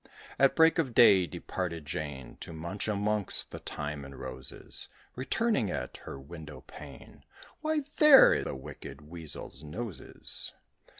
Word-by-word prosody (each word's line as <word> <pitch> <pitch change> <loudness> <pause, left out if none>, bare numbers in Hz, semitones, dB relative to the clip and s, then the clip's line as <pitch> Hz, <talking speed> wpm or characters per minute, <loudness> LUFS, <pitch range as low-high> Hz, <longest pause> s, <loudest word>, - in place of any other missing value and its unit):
At 135 0 +5
break 160 0 +5
of 130 -8 -1
day 95 -6 +7
departed 85 0 -4
Jane, 75 -4 -5
To - - -8
munch 85 +7 -4
amongst 105 -1 0
the - - -7
thyme 75 -1 -4
and 70 0 -10
roses, 65 +1 -3 0.3
Returning, 130 - +1
at - - -4
her 70 - -7
window 75 -1 -10
pane - - -12 0.4
"Why, 310 0 0 0.2
there 300 -3 +8
the - - -4
wicked 70 +1 -9
Weasel's 75 -3 -6
nose 95 +6 -6
is!" - - -3
85 Hz, 135 wpm, -30 LUFS, 75-120 Hz, 0.4 s, there